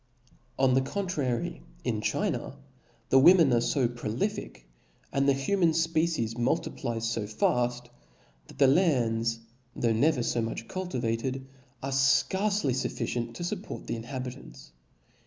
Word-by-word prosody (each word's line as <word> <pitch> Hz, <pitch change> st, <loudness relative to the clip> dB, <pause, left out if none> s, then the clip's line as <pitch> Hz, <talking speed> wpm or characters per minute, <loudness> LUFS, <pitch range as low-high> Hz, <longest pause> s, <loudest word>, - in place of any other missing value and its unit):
On 130 Hz, -1 st, +3 dB
the 130 Hz, -, +4 dB
contrary, 145 Hz, -6 st, -2 dB, 0.2 s
in -, -, -1 dB
China -, -, -2 dB, 0.5 s
the 135 Hz, -, +6 dB
women 165 Hz, -2 st, +7 dB
arc 120 Hz, -, +3 dB
fa 125 Hz, +1 st, +1 dB
prolific, 120 Hz, -, -4 dB, 0.5 s
and 140 Hz, 0 st, +2 dB
the -, -, +5 dB
human 165 Hz, +5 st, +2 dB
fpecies 160 Hz, -7 st, 0 dB
multiplies 115 Hz, -1 st, -1 dB
fo 110 Hz, -2 st, -2 dB
faft, 120 Hz, +3 st, 0 dB, 0.6 s
that -, -, -14 dB
the 140 Hz, -, +5 dB
lands, 115 Hz, -7 st, +2 dB, 0.3 s
tho* 115 Hz, -1 st, +1 dB
never 125 Hz, +3 st, +2 dB
fo 120 Hz, -, 0 dB
much 115 Hz, 0 st, -4 dB
cultivated, 130 Hz, -7 st, -3 dB, 0.4 s
arc 135 Hz, 0 st, -2 dB
fcarce 190 Hz, +9 st, +2 dB
fufficient 120 Hz, -2 st, -2 dB
to 175 Hz, -, -5 dB
fupport 190 Hz, +3 st, -5 dB
the -, -, -3 dB
inhabitants. 120 Hz, -, -7 dB
130 Hz, 125 wpm, -28 LUFS, 115-160 Hz, 0.6 s, women